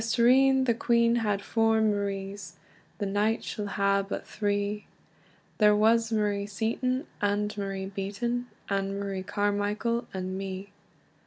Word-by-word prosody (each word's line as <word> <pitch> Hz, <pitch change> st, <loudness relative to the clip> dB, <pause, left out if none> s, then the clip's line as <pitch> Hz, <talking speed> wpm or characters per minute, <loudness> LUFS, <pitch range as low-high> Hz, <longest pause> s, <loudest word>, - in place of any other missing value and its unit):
"Yestreen 260 Hz, +4 st, +4 dB
the 235 Hz, -, +3 dB
queen 235 Hz, 0 st, +3 dB
had 205 Hz, -3 st, 0 dB
four 225 Hz, -1 st, +2 dB
Maries, 200 Hz, -3 st, -2 dB, 0.4 s
The 205 Hz, -, -2 dB
night 205 Hz, +3 st, +1 dB
she'll 205 Hz, -1 st, -4 dB
hae 200 Hz, 0 st, +2 dB
but 195 Hz, 0 st, -5 dB
three; 205 Hz, 0 st, -2 dB, 0.7 s
There 210 Hz, -1 st, +6 dB
was 225 Hz, +2 st, +3 dB
Marie 205 Hz, -2 st, 0 dB
Seaton, 250 Hz, +6 st, -1 dB, 0.2 s
and 205 Hz, +1 st, 0 dB
Marie 195 Hz, -1 st, -3 dB
Beaten, 205 Hz, +6 st, -3 dB, 0.2 s
And 195 Hz, 0 st, -1 dB
Marie 195 Hz, -1 st, -3 dB
Carmichael, 205 Hz, +4 st, -1 dB
and 185 Hz, 0 st, -4 dB
me. 195 Hz, 0 st, -6 dB
205 Hz, 130 wpm, -28 LUFS, 200-230 Hz, 0.7 s, There